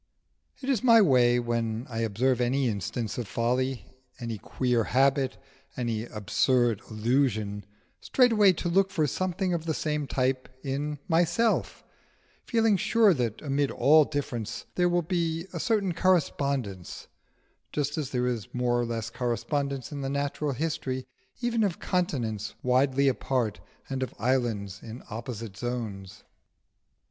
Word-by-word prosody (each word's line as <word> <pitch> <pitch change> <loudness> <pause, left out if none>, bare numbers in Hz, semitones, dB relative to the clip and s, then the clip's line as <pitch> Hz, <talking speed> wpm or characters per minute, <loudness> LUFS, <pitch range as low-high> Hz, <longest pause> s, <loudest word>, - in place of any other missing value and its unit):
It - - -4
is 265 -5 +1
my 230 -2 +7
way 125 - +5
when 115 -1 -2
I 115 -3 -4
observe 115 +3 +1
any 130 +2 +1
instance 105 +3 -3
of 120 - -4
folly, 125 +3 -1 0.3
any 115 -3 -4
queer 125 -1 0
habit, 135 +1 +2 0.4
any 115 -3 -2
absurd 115 +1 +1
illusion, 110 -3 0 0.3
straightway 220 -7 +4
to 175 - -4
look 190 +3 +3
for 170 -6 +1
something 185 +4 -1
of 165 -1 -2
the 160 - 0
same 150 -2 -1
type 130 0 0
in 145 +2 -2
myself, 175 +7 +1 0.6
feeling 225 -4 +3
sure 220 +1 +4
that 120 -5 -2
amid 140 -1 +1
all 155 +2 +5
differences 120 -6 -4
there 175 0 +2
will 175 0 +1
be 165 -1 -1
a 170 - -3
certain 200 -2 +1
correspondence; 140 - 0 0.7
just 145 0 -1
as 150 -4 -3
there 125 -1 0
is 120 -5 -2
more 120 -1 +1
or 120 - +1
less 115 -1 -3
correspondence 135 +2 -2
in 145 -1 -5
the 135 - -2
natural 140 +1 -1
history 130 -3 -2 0.4
even 235 -2 +1
of 195 -5 0
continents 120 - -2
widely 130 +2 +3
apart, 125 -4 0 0.3
and 135 -1 -3
of 130 - -3
islands 110 -6 -1
in 115 +2 -9
opposite 115 -2 -6
zones. 110 -6 -5
130 Hz, 140 wpm, -28 LUFS, 115-160 Hz, 0.7 s, my